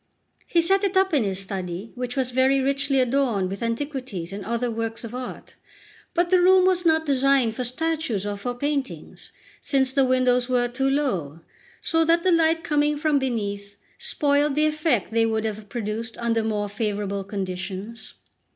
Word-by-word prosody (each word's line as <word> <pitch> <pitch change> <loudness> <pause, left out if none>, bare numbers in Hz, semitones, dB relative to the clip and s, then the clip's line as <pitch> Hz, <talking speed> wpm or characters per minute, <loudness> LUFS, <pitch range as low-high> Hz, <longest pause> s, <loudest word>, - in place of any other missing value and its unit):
He 340 - +3
set 385 +4 +2
it 385 -1 +1
up 380 -2 +3
in 280 -6 +3
his 195 -2 -1
study, 190 +1 -4
which 250 0 -4
was 260 -2 0
very 260 +2 +3
richly 275 +1 +1
adorned 245 -7 +1
with 195 - -6
antiquities 230 - -4
and 200 0 -6
other 235 +4 -2
works 225 0 -4
of 230 0 -7
art; 250 0 -7 0.6
but 345 +1 +1
the 365 -1 +5
room 370 +1 +6
was 365 -2 +2
not 320 0 +3
designed 270 -4 +2
for 255 - -2
statues 275 -5 -1
or 205 0 -2
for 245 +5 -4
paintings, 285 +1 -4 0.3
since 265 -2 +1
the 275 0 +3
windows 255 -1 +2
were 245 -1 +2
too 265 +3 -1
low, 190 - -1 0.4
so 325 0 +2
that 335 +1 +2
the 370 - +3
light 325 0 +3
coming 295 -2 +1
from 300 -1 +2
beneath 205 -6 -3 0.2
spoiled 290 0 +1
the 305 +1 +3
effect 305 - 0
they 225 0 +2
would 220 0 -1
have 215 -1 -5
produced 225 0 -4
under 230 -1 0
more 210 -2 -1
favourable 205 -1 -3
conditions. 195 +3 -6
250 Hz, 175 wpm, -24 LUFS, 215-290 Hz, 0.6 s, room